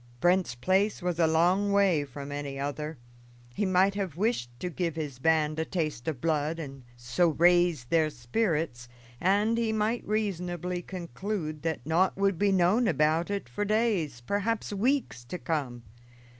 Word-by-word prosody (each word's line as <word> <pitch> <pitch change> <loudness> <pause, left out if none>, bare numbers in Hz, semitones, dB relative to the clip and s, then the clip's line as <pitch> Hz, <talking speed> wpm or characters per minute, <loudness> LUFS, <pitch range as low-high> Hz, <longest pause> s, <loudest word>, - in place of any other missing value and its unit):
Brent's 175 -6 +2
place 190 - +1
was 175 -1 -1
a 165 - +5
long 180 +5 +3
way 195 -7 +3
from 140 +1 -8
any 145 -1 -5
other. 150 +2 -4 0.6
He 205 +6 0
might 185 +2 +3
have 195 -6 -3
wished 205 - 0
to 180 - -3
give 170 -2 -2
his 145 -5 -5
band 155 +1 +2
a - - +1
taste 155 -9 -3
of 155 -6 -2
blood, 155 0 0
and 135 -4 -7 0.2
so 125 +9 +1
raise 175 -3 +3
their 155 +4 +2
spirits, 145 - -2 0.3
and 205 +5 +2
he 225 -2 +1
might 220 +2 0
reasonably 180 -4 -2
conclude 170 - -5
that 160 -6 -3
naught 170 +5 +2
would 195 -3 +1
be 205 -1 +3
known 195 +6 +3
about 155 +2 +2
it 200 -8 -3
for 120 +12 -3
days, 205 - 0
perhaps 205 - -1
weeks 235 - 0
to 180 - -5
come. 135 -9 -3
170 Hz, 160 wpm, -28 LUFS, 150-200 Hz, 0.6 s, a